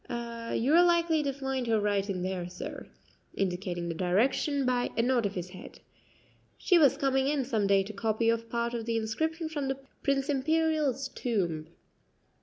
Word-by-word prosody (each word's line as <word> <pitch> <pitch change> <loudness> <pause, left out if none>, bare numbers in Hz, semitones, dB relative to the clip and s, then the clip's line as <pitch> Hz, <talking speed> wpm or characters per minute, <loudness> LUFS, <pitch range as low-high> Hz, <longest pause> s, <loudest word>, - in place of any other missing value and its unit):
"You 235 +2 -2
are 345 +2 +7
likely 340 -2 +3
to 280 -2 -1
find 265 -2 -3
her 225 -1 +3
right 205 -1 0
in 185 -2 -2
there, 185 -1 -3
sir," 180 - -7 0.5
indicating 180 -2 -2
the 170 - -2
direction 235 - +1
by 250 -1 +1
a 230 - +3
nod 240 -3 +2
of 200 - -8
his 180 0 -4
head. 185 - -11 0.8
"She 360 -3 +4
was 285 -5 +5
coming 270 -1 +1
in 285 -2 0
some 220 -5 0
day 195 -1 +4
to 210 +2 -8
copy 225 +2 +1
off 230 0 -3
part 235 0 -1
of 230 -2 -3
the 230 -1 +1
inscription 315 +10 -2
from 295 -3 -3
the 270 0 -1 0.2
Prince 275 0 +1
Imperial's 295 -1 +1
tomb." 175 -13 -2
235 Hz, 180 wpm, -29 LUFS, 200-275 Hz, 0.8 s, are